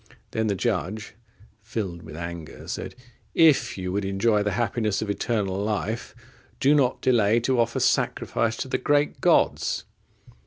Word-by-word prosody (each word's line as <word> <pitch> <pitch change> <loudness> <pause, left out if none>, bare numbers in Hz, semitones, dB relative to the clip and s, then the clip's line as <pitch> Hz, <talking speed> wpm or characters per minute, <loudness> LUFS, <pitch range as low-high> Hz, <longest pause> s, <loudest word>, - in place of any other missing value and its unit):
Then 110 0 0
the 100 - +1
judge, 100 - -2 0.5
filled 100 -6 -4
with 80 -1 -10
anger, 85 -1 -7
said, - - -5 0.4
"If 160 -9 +4
you 90 -1 -3
would 100 +2 -1
enjoy 105 +3 +2
the 105 -1 0
happiness 110 -3 0
of 105 - -2
eternal 100 -3 -1
life, 110 +3 -3 0.4
do 140 +2 +4
not 135 -4 +2
delay 115 -3 +3
to 130 +1 +1
offer 115 0 +1
sacrifice 115 -1 +1
to - - -3
the - - -1
great 145 +2 +1
gods." - - +2
110 Hz, 150 wpm, -25 LUFS, 95-120 Hz, 0.5 s, If